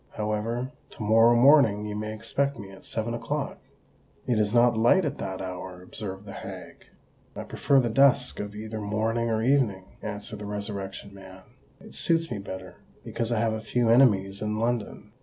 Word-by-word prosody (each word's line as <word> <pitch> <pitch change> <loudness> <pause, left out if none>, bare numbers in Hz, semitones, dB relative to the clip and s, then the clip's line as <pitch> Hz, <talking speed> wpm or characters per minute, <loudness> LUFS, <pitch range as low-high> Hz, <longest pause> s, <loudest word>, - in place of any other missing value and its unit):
However, 110 +4 -2 0.2
to - - -8
morrow 115 +2 +5
morning 120 -5 +5
you 105 -1 -4
may 105 0 -4
expect 135 +6 -1
me 100 -3 -9
at 95 - -14
seven 115 +1 -3
o'clock——" 120 - -3 0.7
"It 120 -4 +1
is 105 -1 +1
not 120 0 +4
light 120 +12 +4
at 145 -1 -3
that 95 -1 -4
hour," 90 0 -7
observed 95 +1 -6
the 100 - -9
hag. - - -9 0.5
"I - - -5
prefer 140 - +2
the 125 - +1
dusk 130 0 +4
of 105 0 -5
either 110 +1 -6
morning 110 +3 -1
or 110 0 0
evening," 120 -8 +2 0.2
answered 105 0 -6
the 105 - -6
Resurrection 100 -1 -5
Man. 95 -1 -12 0.4
"It - - -14
suits 165 0 +1
me 110 - -3
better—because 95 +4 -7
I 115 - +1
have 115 -1 +1
a 110 - -4
few 115 +1 0
enemies 100 -6 +4
in 105 0 -2
London. 110 -2 -2
110 Hz, 175 wpm, -27 LUFS, 100-120 Hz, 0.7 s, morrow